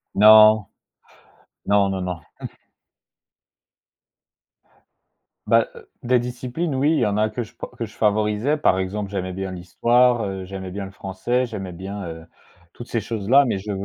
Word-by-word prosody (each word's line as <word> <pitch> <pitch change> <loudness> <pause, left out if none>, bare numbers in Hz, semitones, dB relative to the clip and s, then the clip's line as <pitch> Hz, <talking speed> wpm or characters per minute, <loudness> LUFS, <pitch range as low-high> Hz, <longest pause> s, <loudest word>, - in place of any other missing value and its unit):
Non! 110 0 +7 1.0
Non, 100 -1 +3
non, 95 -1 -3
non. 90 -3 -4 0.2
Mmh. - - -4 3.0
Bah, - - +4 0.4
des 125 0 +3
disciplines, 125 +5 -4
oui, 145 +4 +2
il - - +1
y - - +2
en 105 0 0
a 110 0 +2
que 120 - -4
je 110 - -15
p - - -6
que 115 - -3
je 110 - -14
favorisais, 105 +6 +1
par 95 -10 +2
exemple, 100 +2 -3
j'aimais 95 -2 -4
bien 95 0 -5
l'Histoire, 120 +7 +2
heu, 95 -1 -5
j'aimais 95 0 -7
bien 100 +1 -5
le 95 - -10
Français, 100 +7 -2
j'aimais 95 -5 -6
bien, 95 +1 -7
heu, 80 0 -9 0.5
toutes 120 - -11
ces 115 - -1
choses-là 115 +6 +2
mais 100 - -1
je 105 +2 -6
105 Hz, 160 wpm, -22 LUFS, 95-120 Hz, 3.0 s, Non